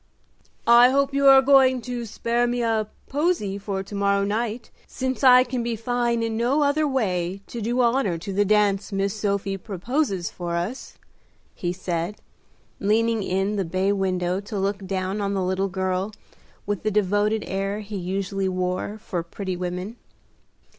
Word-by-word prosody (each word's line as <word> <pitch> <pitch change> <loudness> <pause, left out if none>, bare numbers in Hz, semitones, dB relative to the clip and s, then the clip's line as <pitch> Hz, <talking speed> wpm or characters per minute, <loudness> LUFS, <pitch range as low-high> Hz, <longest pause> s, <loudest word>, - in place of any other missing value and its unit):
"I 240 +1 +7
hope 275 +1 +1
you 280 0 +3
are 270 0 +8
going 260 -2 +5
to 245 -1 -4
spare 235 +3 0
me 240 0 -1
a 220 -2 +1 0.2
posy 280 - 0
for 195 -1 -3
to 195 - -12
morrow 200 0 +2
night, 220 +3 -2 0.2
since 260 +1 -3
I 255 -1 +8
can 255 -1 -3
be 235 0 -2
fine 235 0 0
in 225 -1 -2
no 250 +6 +2
other 295 +2 +2
way 190 -8 -1
to 235 - -7
do 240 +4 0
honor 235 -7 +2
to 190 +4 -6
the 205 +2 +3
dance 205 0 +2
Miss 195 0 0
Sophie 200 -2 -1
proposes 195 - -2
for 175 -1 -4
us," 185 +10 -4 0.6
he 175 - -3
said, 180 +1 -3 0.6
leaning 225 +2 +2
in 195 +2 -1
the 195 - +1
bay 185 +3 0
window 185 -2 0
to 205 +1 -6
look 195 0 -2
down 190 +2 -2
on 200 0 -1
the 190 - 0
little 190 +2 0
girl, 190 +1 -1 0.5
with 205 -2 -2
the 215 - 0
devoted 210 +1 +1
air 195 +2 -2
he 210 0 -7
usually 195 +1 -2
wore 185 +3 -2
for 190 -5 -4
pretty 185 +2 -5
women. 180 +5 -4
205 Hz, 165 wpm, -24 LUFS, 190-235 Hz, 0.6 s, are